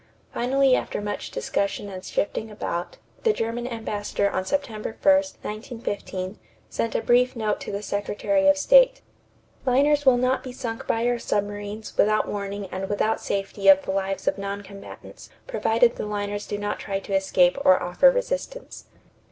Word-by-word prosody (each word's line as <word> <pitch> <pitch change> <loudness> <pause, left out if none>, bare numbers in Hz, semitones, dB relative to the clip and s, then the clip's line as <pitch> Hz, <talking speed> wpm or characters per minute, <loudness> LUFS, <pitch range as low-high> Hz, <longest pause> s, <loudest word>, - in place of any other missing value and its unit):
Finally 265 +1 +3
after - - -2
much 205 0 -4
discussion 200 +1 -2
and 185 -2 -8
shifting 220 +2 -2
about, 175 -4 -4 0.2
the 450 - +3
German 235 - -3
ambassador 210 -4 -2
on 185 - -1
September 225 -3 -3
1, 290 - +6
1915, 215 -8 -4 0.3
sent 230 - -2
a - - 0
brief 250 +2 +3
note 215 -3 -1
to - - -5
the 200 +1 -4
Secretary 205 +9 0
of 290 0 +6
State: - - +5 0.6
"Liners 285 +3 +3
will 260 -3 +5
not 255 +1 +1
be 255 - -6
sunk 235 -3 -6
by 230 +1 +1
our 245 0 +1
submarines 205 0 -3
without 215 +1 +3
warning 200 0 -4
and 190 +1 -4
without 215 +2 0
safety 195 0 -2
of 195 0 +8
the - - -3
lives 195 0 -2
of - - +1
non 200 +1 -4
combatants, 200 0 -12 0.2
provided 240 - +2
the - - -3
liners 205 0 -3
do 205 - -3
not 205 0 -3
try 195 -1 -3
to 195 - -7
escape 190 +2 +3
or 185 0 +6
offer 175 - +5
resistance." - - -3
215 Hz, 165 wpm, -24 LUFS, 200-255 Hz, 0.6 s, of